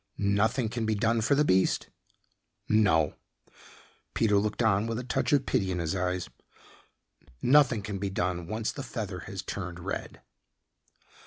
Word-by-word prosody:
"Nothing 110 Hz, +5 st, +1 dB
can 115 Hz, 0 st, -3 dB
be 110 Hz, -, +1 dB
done 115 Hz, +2 st, +1 dB
for 130 Hz, +6 st, +3 dB
the 150 Hz, +1 st, +3 dB
beast?" 95 Hz, -4 st, +2 dB, 0.8 s
"No." 80 Hz, -9 st, +3 dB, 1.0 s
Peter 105 Hz, -3 st, +3 dB
looked 105 Hz, +3 st, -1 dB
on 105 Hz, 0 st, +2 dB
with 115 Hz, 0 st, -2 dB
a 125 Hz, -, -4 dB
touch 125 Hz, -, -1 dB
of 140 Hz, -2 st, +3 dB
pity 95 Hz, -, 0 dB
in 90 Hz, -, -1 dB
his 85 Hz, +1 st, -1 dB
eyes, 90 Hz, -1 st, -1 dB, 1.1 s
"Nothing 125 Hz, -, +4 dB
can 100 Hz, -2 st, -4 dB
be 100 Hz, 0 st, -2 dB
done 90 Hz, -2 st, -2 dB
once 110 Hz, +2 st, -2 dB
the -, -, -7 dB
feather -, -, -5 dB
has -, -, -5 dB
turned 90 Hz, -3 st, -5 dB
red." 95 Hz, +3 st, -5 dB
105 Hz, 155 wpm, -28 LUFS, 95-115 Hz, 1.1 s, Nothing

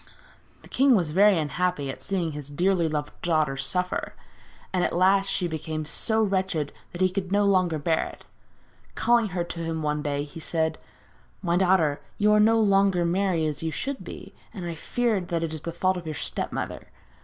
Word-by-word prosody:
The -, -, -13 dB
king 270 Hz, -1 st, +4 dB
was 170 Hz, -7 st, +1 dB
very 200 Hz, +3 st, +5 dB
unhappy 155 Hz, -2 st, -1 dB
at -, -, -11 dB
seeing 180 Hz, -5 st, -1 dB
his 145 Hz, -1 st, -7 dB
dearly 175 Hz, +2 st, +1 dB
loved 150 Hz, -1 st, -3 dB
daughter 155 Hz, -5 st, +1 dB
suffer, 180 Hz, +6 st, -1 dB, 0.6 s
and 180 Hz, -1 st, +1 dB
at -, -, 0 dB
last 195 Hz, +2 st, +3 dB
she 180 Hz, -, 0 dB
became 155 Hz, -1 st, -4 dB
so 220 Hz, +8 st, +1 dB
wretched 190 Hz, -7 st, -1 dB, 0.2 s
that 175 Hz, -, -7 dB
he 185 Hz, -, +4 dB
could 185 Hz, -1 st, -3 dB
no 205 Hz, 0 st, +3 dB
longer 185 Hz, -5 st, +2 dB
bear 160 Hz, +2 st, +1 dB
it. -, -, -13 dB, 0.7 s
Calling 235 Hz, -2 st, +3 dB
her 180 Hz, -3 st, -2 dB
to 170 Hz, 0 st, -7 dB
him 165 Hz, -1 st, -3 dB
one 150 Hz, 0 st, 0 dB
day 145 Hz, -1 st, -1 dB
he 145 Hz, +2 st, -10 dB
said: 160 Hz, 0 st, -1 dB, 0.6 s
'My 170 Hz, -2 st, +1 dB
daughter, 180 Hz, -6 st, +3 dB, 0.2 s
you 210 Hz, 0 st, +3 dB
are 210 Hz, -, +5 dB
no 225 Hz, +2 st, +5 dB
longer 195 Hz, -4 st, +3 dB
merry 175 Hz, -2 st, +1 dB
as 150 Hz, -1 st, -3 dB
you 165 Hz, -, -1 dB
should 260 Hz, -, -4 dB
be, -, -, -9 dB, 0.2 s
and 185 Hz, -3 st, -5 dB
I 170 Hz, -, -3 dB
fear 230 Hz, +6 st, 0 dB
that 170 Hz, -1 st, -2 dB
it 160 Hz, -1 st, -3 dB
is 155 Hz, -, -5 dB
the 170 Hz, -, -4 dB
fault 185 Hz, +2 st, 0 dB
of 170 Hz, -2 st, -7 dB
your 155 Hz, -, -4 dB
step -, -, -3 dB
mother. -, -, -5 dB
175 Hz, 200 wpm, -26 LUFS, 155-195 Hz, 0.7 s, very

